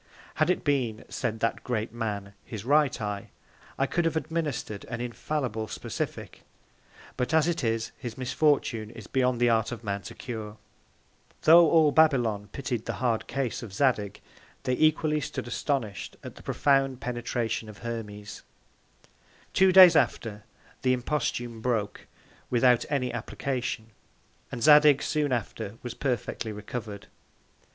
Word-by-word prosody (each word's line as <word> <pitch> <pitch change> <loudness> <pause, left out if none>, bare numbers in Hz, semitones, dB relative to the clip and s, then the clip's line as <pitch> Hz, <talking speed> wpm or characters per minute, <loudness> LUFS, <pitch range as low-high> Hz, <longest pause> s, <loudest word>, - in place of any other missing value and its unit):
Had - - +4
it 180 - +1
been, 125 -7 0
said 110 -2 -3
that 115 - 0
Great 115 -3 -2
Man, 105 -4 -4
his 110 -2 -7
right 145 -1 +3
Eye, 105 -2 -4 0.5
I 135 - +2
could 175 +5 0
have 165 - +1
administred 155 -10 -3
an 115 0 -5
infallible 120 -2 -3
Specific; - - -5 0.8
but 125 +5 0
as 160 0 +4
it 170 -4 -1
is, 115 -1 -1
his 120 -3 -6
Misfortune 130 -4 +1
is 115 - -11
beyond 125 -2 +1
the 120 0 +4
Art 110 0 +2
of 120 -1 -6
Man 100 -2 -2
to 90 - -9
cure. 110 -3 -6 0.9
Tho' 165 +1 +8
all 160 -3 +5
Babylon 120 -10 +3
pitied 125 -5 -3
the - - -1
hard 120 -3 0
Case 130 -5 -2
of 110 -5 -9
Zadig, 105 -5 +1 0.4
they 130 - 0
equally 155 +1 +2
stood 125 - -5
astonish'd 120 -4 -3
at - - -8
the - - -14
profound 135 -2 +1
Penetration 120 -2 -3
of 105 - -11
Hermes. 105 -3 -6 1.1
Two 190 0 +5
Days 185 -2 +9
after 105 -8 0 0.4
the 130 -1 +3
Imposthume 120 -3 -2
broke, 110 -4 -2 0.4
without 125 0 +4
any 130 -4 -1
Application, 125 -4 -3 0.6
and 120 - -4
Zadig 150 -1 +7
soon 150 -2 0
after 115 -2 -3
was 125 -1 -5
perfectly 125 -3 -2
recover'd. 105 0 -6
120 Hz, 145 wpm, -27 LUFS, 110-140 Hz, 1.1 s, Days